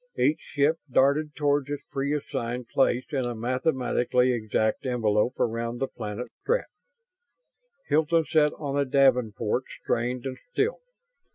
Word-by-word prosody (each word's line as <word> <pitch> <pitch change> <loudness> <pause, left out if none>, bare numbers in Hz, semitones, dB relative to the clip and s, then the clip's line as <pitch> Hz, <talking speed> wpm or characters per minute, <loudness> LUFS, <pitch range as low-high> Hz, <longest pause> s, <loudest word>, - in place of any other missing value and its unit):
Each 135 +5 +2
ship 150 +3 0
darted 145 +4 +3
toward 145 -2 +1
its 145 -1 -4
pre 140 0 -1
assigned 120 -4 -4
place 130 -2 +2
in 130 -4 0
a 120 - -3
mathematically 125 0 +1
exact 110 -1 0
envelope 120 -2 +1
around 115 +1 -1
the 135 - 0
planet 110 0 -6
Strett. - - +1 1.2
Hilton 160 +1 +3
sat 150 -2 +3
on 145 -2 -2
a - - +4
davenport 125 -3 +2 0.2
strained 125 +2 -1
and 130 -1 -5
still. 445 - 0
130 Hz, 130 wpm, -26 LUFS, 120-145 Hz, 1.2 s, a